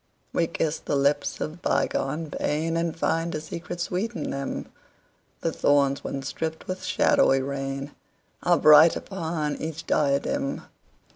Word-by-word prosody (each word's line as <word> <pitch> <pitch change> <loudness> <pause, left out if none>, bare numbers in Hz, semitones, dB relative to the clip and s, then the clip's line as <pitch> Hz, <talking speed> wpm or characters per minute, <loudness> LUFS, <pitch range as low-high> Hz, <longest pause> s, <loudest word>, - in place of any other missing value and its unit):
We 165 - +2
kiss 160 -2 -1
the - - -2
lips 140 +1 +1
of 160 +3 -5
bygone 150 +3 -1
painAnd 165 +3 -1
find 165 0 0
a - - -1
secret 170 +3 -7
sweet 190 +6 -2
in - - -3
them:The 135 0 -7
thorns 140 -1 +2
once 135 +1 -4
dripped 160 0 -4
with 185 0 -5
shadowy 275 - +3
rainAre 140 +4 -3
bright 155 +2 +8
upon 160 -5 -3
each 160 0 -5
diadem. 155 - 0
155 Hz, 125 wpm, -26 LUFS, 140-170 Hz, -, bright